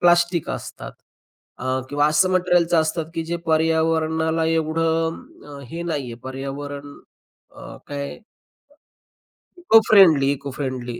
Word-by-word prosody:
plastic 175 -1 +3
असतात, - - -7 0.7
अ, 130 0 -1
किंवा 145 +1 +2
असं 155 +5 +3
मटेरिअलच्या 175 -2 +2
असतात 160 0 -2
की 165 - -3
जे 170 +1 -3
पर्यावरणाला 160 0 +1
एवढं 165 0 0 0.3
अं, 140 -1 -10
हे 170 +1 -5
नाहीये 145 -8 -4
पर्यावरण 140 +2 -7 0.6
अ, - - -10
काय 140 -1 -5
अ, - - -20 1.4
इको-फ्रेंडली, 195 - +5
इको-फ्रेंडली 130 -3 -5
160 Hz, 110 wpm, -22 LUFS, 140-165 Hz, 1.4 s, इको-फ्रेंडली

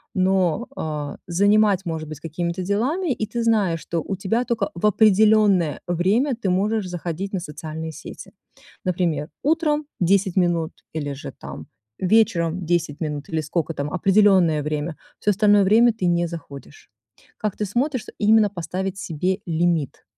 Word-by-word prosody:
Но, 185 +2 +1
э, 150 -2 -4
занимать, 200 +2 +3
может 160 -2 -4
быть, 155 -1 -8
какими-то 170 +3 -3
делами, 260 - 0
и 220 - -3
ты 230 +2 -3
знаешь, 205 -7 +2
что 170 - -3
у 195 - -2
тебя 200 +6 0
только 230 -5 -1
в 170 - -2
определённое 210 -5 +4
время 200 - +1
ты 205 -5 -2
можешь 205 +2 0
заходить 180 +2 -5
на 190 - 0
социальные 160 0 -6
сети. - - -10 0.5
Например, 170 -4 -1
утром- 305 -1 +1
10 190 +1 +2
минут, 175 -3 +1 0.2
или 145 -3 -3
же 140 - -8
там - - -9 0.3
вечером 185 -4 +2
10 165 -3 0
минут, 150 -2 -3
или 160 -1 -1
сколько 160 +2 -2
там 145 0 -4
определённое 185 -5 +4
время. 150 +1 -3 0.2
Всё 210 - +2
остальное 205 0 +4
время 225 +5 +5
ты 210 -4 -3
не 175 0 +2
заходишь. 165 - -10 0.5
Как 210 -2 -3
ты 210 - -1
смотришь, 250 +5 -1
именно 215 0 +4
поставить 185 +2 -4
себе 185 +4 -2
лимит? 165 -4 0
185 Hz, 150 wpm, -22 LUFS, 165-210 Hz, 0.5 s, время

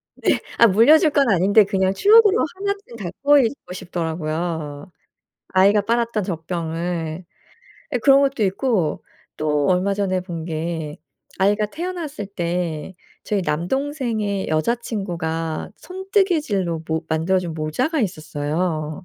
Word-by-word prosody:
네. - - +1 0.2
아 235 - +7
물려줄 295 - +5
건 280 -3 +3
아닌데 200 +2 +5
그냥 190 -1 0
추억으로 425 - +5
1 400 +1 -1
쯤 235 - -11
갖고 245 +10 +2
있고 230 -7 -2
싶더라고요, 160 -3 -4 0.6
아이가 200 +3 +4
빨았던 230 0 0
젖병을. 165 -1 -4 0.7
예 250 - +2
그런 275 +3 +5
것도 270 -5 0
있고 195 - 0 0.3
또 150 -2 0
얼마 185 +2 +2
전에 190 -2 0
본 170 -3 -6
게 160 -2 -4 0.4
아이가 205 +2 +2
태어났을 320 - -5
때 175 -3 -3 0.3
저희 205 -2 0
남동생의 215 - -2
여자친구가 165 -4 -2
손뜨개질로 330 - -1
모 160 +1 -2
만들어준 170 +2 0
모자가 245 - -1
있었어요. 155 -2 -3
190 Hz, 265 characters per minute, -21 LUFS, 165-235 Hz, 0.7 s, 아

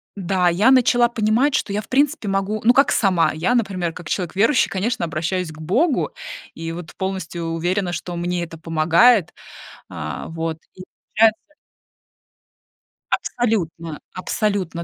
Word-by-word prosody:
да, 185 -2 +1
я 190 +8 +3
начала 245 -2 +4
понимать, 235 +5 +1
что 215 - -1
я, 205 +1 -1
в - - -16
принципе, 280 -3 +1
могу, 195 +2 -1
ну 245 - +6
как 275 +3 +4
сама, 185 -5 +2
я, 170 +11 0
например, 185 -7 -1
как 175 -2 -9
человек 180 -2 -2
верующий, 230 +8 +3
конечно, 205 0 -1
обращаюсь 165 +3 -2
к 155 - -14
Богу 250 - +1 0.4
и 165 0 -5
вот 170 -1 -8
полностью 190 -3 -4
уверена, 175 +2 -1
что 175 +1 -5
мне 175 0 -2
это 165 -1 -8
помогает. 165 +6 +3 0.6
А - - -6
вот, 165 -1 -3 0.2
и 185 - -11 0.3
получается 225 +6 +3 1.6
Абсолютно, 170 -9 -2
абсолютно, 185 -3 -2
190 Hz, 140 wpm, -21 LUFS, 170-225 Hz, 1.6 s, ну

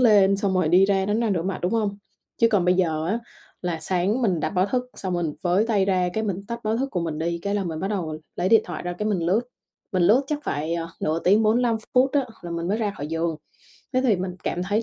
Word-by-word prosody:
lên 200 -5 +5
xong 195 -1 0
rồi 180 -4 +2
đi 180 +3 +6
ra 195 -1 +1
đánh 210 +3 +1
răng 225 -4 +1
rửa 170 -3 0
mặt, 190 +1 -2
đúng 180 - 0
hông? 205 -3 0 0.4
Chứ 230 - +5
còn 200 -6 +2
bây 180 0 +4
giờ 160 -3 0
á 220 +6 0 0.4
là 170 -3 -2
sáng 190 +8 0
mình 180 -8 +1
đặt 155 - -1
báo 185 0 +2
thức 250 +3 -1
xong 185 -2 -4
mình 170 -3 -1
với 185 +5 +2
tay 205 -4 +2
ra 185 -2 +1
cái 220 0 -1
mình 195 -2 -2
tắt 235 0 -4
báo 220 +1 +1
thức 270 +2 -2
của 180 - -1
mình 160 -2 -3
đi 170 +1 -1
cái 200 0 -1
là 200 - 0
mình 160 -3 -4
bắt 195 - -1
đầu 165 -7 -3 0.2
lấy 180 +1 0
điện 225 0 +7
thoại 175 -3 -6
ra 175 0 -3
cái 210 +4 -2
mình 200 -4 +1
lướt, 200 +6 +3 0.5
mình 185 -2 +2
lướt 220 +10 +5
chắc 300 0 -1
phải, 155 +4 -2
ờ, 165 -1 -3
nửa 160 +2 0
tiếng 205 +5 +5
45 230 +1 +3 0.2
phút 260 +2 +5
á 280 -3 +2 0.2
là 175 - -7
mình 170 +1 -3
mới 210 - +1
ra 210 -3 -1
khỏi 145 - -4
giường. 165 0 -1 0.6
Thế 255 - +2
thì 225 -7 +3
mình 180 0 -4
cảm 175 - -1
thấy 205 +4 0
190 Hz, 275 wpm, -24 LUFS, 175-215 Hz, 0.6 s, điện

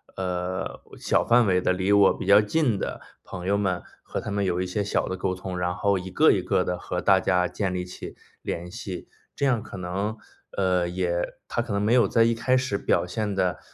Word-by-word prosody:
呃， 90 0 -3 0.2
小 - - +1
范 120 0 +5
围 90 -2 +3
的、 90 - +2
离 95 +2 0
我 100 -1 +6
比 - - -5
较 100 +2 +7
近 115 -1 +1
的 - - -4 0.2
朋 90 -1 -8
友 100 +1 +2
们 95 -3 -1 0.2
和 - - -4
他 - - -5
们 100 0 0
有 90 -1 0
一 - - -1
些 95 +3 -2
小 100 - 0
的 95 - -3
沟 95 0 -1
通， 90 0 -5
然 90 0 0
后 100 0 +1
一 90 +1 -7
个 90 - +5
一 - - +1
个 - - +1
地 90 - -2
和 90 0 -4
大 95 -1 +5
家 90 -1 +2
建 95 -3 -2
立 90 -1 -2
起 90 - -9 0.3
联 85 +1 -4
系， 90 0 -7 0.3
这 140 - 0
样 125 -5 +2
可 - - -9
能， 95 +5 -3 0.4
呃， 90 -2 +1
也 90 -1 -2
它 - - -1
可 120 0 -6
能 100 - 0
没 110 +3 +2
有 125 - +5
在 115 - +4
一 115 0 +3
开 120 +3 +1
始 130 -6 -1
表 - - +1
现 105 +2 -2
得， 90 -3 0
95 Hz, 250 characters per minute, -25 LUFS, 90-105 Hz, 0.4 s, 较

